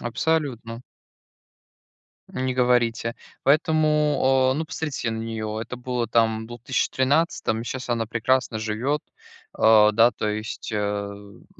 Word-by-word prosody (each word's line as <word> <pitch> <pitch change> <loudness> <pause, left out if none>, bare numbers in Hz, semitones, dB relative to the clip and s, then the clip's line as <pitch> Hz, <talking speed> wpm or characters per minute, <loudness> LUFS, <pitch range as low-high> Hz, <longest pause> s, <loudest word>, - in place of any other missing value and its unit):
Абсолютно. 120 -3 -2 1.5
Не 130 0 -2
говорите. 120 -2 +1 0.3
Поэтому, 150 -3 +3
э, - - -3
ну 160 - -1
посмотрите 150 -7 -3
на 110 - -4
неё. 110 -1 -4
Это 125 - -6
было 125 -1 -2
там 110 -1 +1
в - - -11
двух 120 -1 -10
тыще 130 - 0
тринадцатом, 130 -4 +1
и - - -6
щас 130 +1 -5
она 115 -2 0
прекрасно 120 0 0
живет, 115 +7 -1 0.6
э, 110 -1 +6
да 115 +3 +5
то 105 - -3
есть, 110 +1 -4
э, - - -1
м. 100 -1 -5
120 Hz, 140 wpm, -24 LUFS, 110-130 Hz, 1.5 s, э